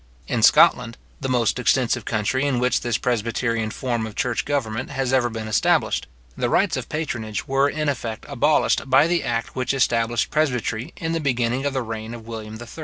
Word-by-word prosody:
In -, -, -1 dB
Scotland, -, -, +5 dB, 0.2 s
the 130 Hz, -, -3 dB
most 125 Hz, -1 st, +1 dB
extensive 120 Hz, -2 st, +1 dB
country 110 Hz, +5 st, 0 dB
in 135 Hz, -3 st, 0 dB
which 125 Hz, +1 st, +1 dB
this 120 Hz, -1 st, 0 dB
presbyterian 115 Hz, -1 st, -1 dB
form 120 Hz, -1 st, -2 dB
of 110 Hz, -, -10 dB
church 120 Hz, 0 st, -1 dB
government 125 Hz, -4 st, -2 dB
has 135 Hz, -2 st, -2 dB
ever 125 Hz, -2 st, +3 dB
been 110 Hz, -1 st, -5 dB
established, 110 Hz, -, +1 dB, 0.3 s
the -, -, -1 dB
rights -, -, +2 dB
of -, -, -5 dB
patronage 120 Hz, -9 st, -3 dB
were 135 Hz, +1 st, +2 dB
in 150 Hz, +1 st, -2 dB
effect 120 Hz, -5 st, -3 dB
abolished 145 Hz, 0 st, +1 dB
by 135 Hz, +3 st, +6 dB
the 170 Hz, +1 st, +1 dB
act 115 Hz, -1 st, -2 dB
which 130 Hz, +1 st, -1 dB
established 115 Hz, -3 st, +1 dB
presbytery 125 Hz, -6 st, -1 dB
in 165 Hz, -3 st, -3 dB
the 165 Hz, -, 0 dB
beginning 125 Hz, -2 st, 0 dB
of 140 Hz, -, -2 dB
the 130 Hz, -2 st, -1 dB
reign 110 Hz, 0 st, -6 dB
of 115 Hz, -2 st, -11 dB
William 110 Hz, -1 st, -7 dB
III. 120 Hz, -, -9 dB
120 Hz, 190 wpm, -23 LUFS, 115-135 Hz, 0.3 s, by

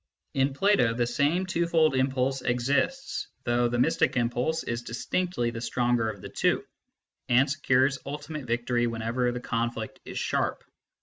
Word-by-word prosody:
In 135 Hz, 0 st, +1 dB
Plato, 195 Hz, -, +3 dB
the 120 Hz, 0 st, +1 dB
same 145 Hz, +9 st, +1 dB
twofold 170 Hz, -4 st, +2 dB
impulse 130 Hz, 0 st, +1 dB
exists, 140 Hz, -, 0 dB, 0.2 s
though 120 Hz, 0 st, +2 dB
the 120 Hz, 0 st, -1 dB
mystic 125 Hz, -, +2 dB
impulse 125 Hz, +7 st, 0 dB
is 115 Hz, 0 st, -3 dB
distinctly 120 Hz, +2 st, -2 dB
the 115 Hz, -1 st, -6 dB
stronger 120 Hz, -2 st, +1 dB
of 100 Hz, -3 st, -7 dB
the -, -, -6 dB
two, -, -, +1 dB, 0.6 s
and 125 Hz, +3 st, +5 dB
secures 135 Hz, -1 st, +2 dB
ultimate 150 Hz, 0 st, -6 dB
victory 120 Hz, +1 st, +1 dB
whenever 115 Hz, +2 st, -1 dB
the 125 Hz, -, -4 dB
conflict 115 Hz, -2 st, -3 dB
is -, -, -7 dB
sharp. -, -, -1 dB
125 Hz, 145 wpm, -27 LUFS, 120-145 Hz, 0.6 s, and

